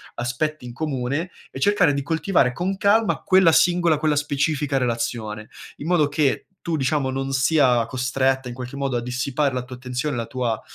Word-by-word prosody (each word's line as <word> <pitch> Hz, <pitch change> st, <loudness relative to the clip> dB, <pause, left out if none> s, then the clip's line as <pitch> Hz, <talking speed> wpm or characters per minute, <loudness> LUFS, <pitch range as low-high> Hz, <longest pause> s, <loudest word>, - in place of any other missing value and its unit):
aspetti 130 Hz, +5 st, -2 dB
in 120 Hz, -, -7 dB
comune, 140 Hz, +3 st, -2 dB, 0.2 s
e -, -, -7 dB
cercare 205 Hz, -2 st, +3 dB
di 140 Hz, -, -1 dB
coltivare 160 Hz, -2 st, +1 dB
con 185 Hz, +6 st, -2 dB
calma 210 Hz, +3 st, +2 dB
quella 185 Hz, -3 st, +5 dB
singola, 175 Hz, -1 st, +3 dB
quella 150 Hz, 0 st, +1 dB
specifica 145 Hz, 0 st, 0 dB
relazione, 115 Hz, -3 st, -3 dB, 0.3 s
in 150 Hz, -, -7 dB
modo 175 Hz, -5 st, +3 dB
che 145 Hz, -1 st, 0 dB
tu, 170 Hz, -2 st, -2 dB
diciamo, 135 Hz, 0 st, 0 dB
non 135 Hz, +1 st, -3 dB
sia 135 Hz, -4 st, +3 dB
costretta 130 Hz, +1 st, 0 dB
in 120 Hz, -, -5 dB
qualche 125 Hz, +2 st, -7 dB
modo 135 Hz, -2 st, -1 dB
a 120 Hz, -, 0 dB
dissipare 130 Hz, +4 st, -1 dB
la 125 Hz, -1 st, -2 dB
tua 125 Hz, 0 st, -9 dB
attenzione, 125 Hz, +3 st, -3 dB
la 115 Hz, -1 st, -3 dB
tua, 125 Hz, -4 st, -2 dB
135 Hz, 180 wpm, -23 LUFS, 125-155 Hz, 0.3 s, quella